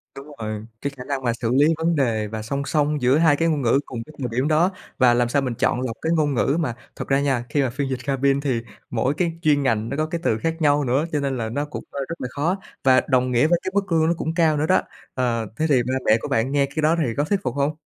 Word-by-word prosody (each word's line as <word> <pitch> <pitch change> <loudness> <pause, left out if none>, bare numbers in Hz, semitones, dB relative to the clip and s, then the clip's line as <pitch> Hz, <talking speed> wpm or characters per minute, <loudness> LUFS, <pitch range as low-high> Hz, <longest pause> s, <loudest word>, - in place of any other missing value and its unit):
Đúng 135 +1 -10
rồi, 110 -1 -4 0.2
cái 140 - -2
khả 125 - -7
năng 135 -1 -3
mà 120 - +2
xử 115 -1 0
lý 145 +3 +5
vấn 165 +1 +1
đề 115 -7 0
và 110 +1 -5
song 140 +6 -3
song 150 0 0
giữa 125 +3 +4
hai 160 -3 +4
cái 165 +3 +1
ngôn 155 -3 +1
ngữ 125 +2 +3
cùng 115 -3 -6
cái 155 - -15
thời 130 - -2
điểm 130 +5 0
đó, 160 +5 +3 0.3
và 125 -2 +5
làm 120 0 +2
sao 140 +3 +2
mình 125 -3 -2
chọn 120 - +1
lọc 120 -3 -3
cái 160 - 0
ngôn 150 -3 +1
ngữ 135 +4 +1
mà 125 -9 -1 0.2
thật - - -6
ra 135 0 +3
nha, 130 -4 0
khi 145 - +1
mà 130 - +1
phiên 135 +3 -3
dịch 130 -1 -2
cabin 140 0 +1
thì 130 -5 -1 0.3
mỗi 125 +4 0
cái 170 +1 -1
chuyên 150 -4 +3
ngành 115 -3 0
nó 140 - -3
có 155 - +1
cái 165 +1 -4
từ 110 - +1
khác 165 +6 -1
nhau 145 -1 +3
nữa, 135 +4 +1
cho 150 - 0
nên 135 -2 -1
là 110 -2 -3
nó 145 +6 -2
cũng, 150 - -7
a, 140 - -5
rất 165 - -6
là - - -2
khó 160 +8 0 0.3
và 130 -1 +5
đồng 130 -2 +2
nghĩa 125 +4 +3
với 175 +1 +2
cái 185 - -3
mức 200 -2 -1
lương 160 -1 +3
nó 170 - +3
cũng 160 - -2
cao 165 -3 +3
nữa 150 - +1
đó. 185 +2 +4 0.3
Ờ, 115 -3 -1
thế 155 - 0
thì 130 -4 +4
ba 130 +2 -2
mẹ 110 - +5
của - - -4
bạn 115 +4 0
nghe 140 -1 +3
cái 145 +3 -4
đó 155 +2 +4
thì 120 -5 -1
có 145 - +2
thuyết 195 +6 0
phục - - -2
hông? 145 +2 0
140 Hz, 300 wpm, -23 LUFS, 125-155 Hz, 0.3 s, lý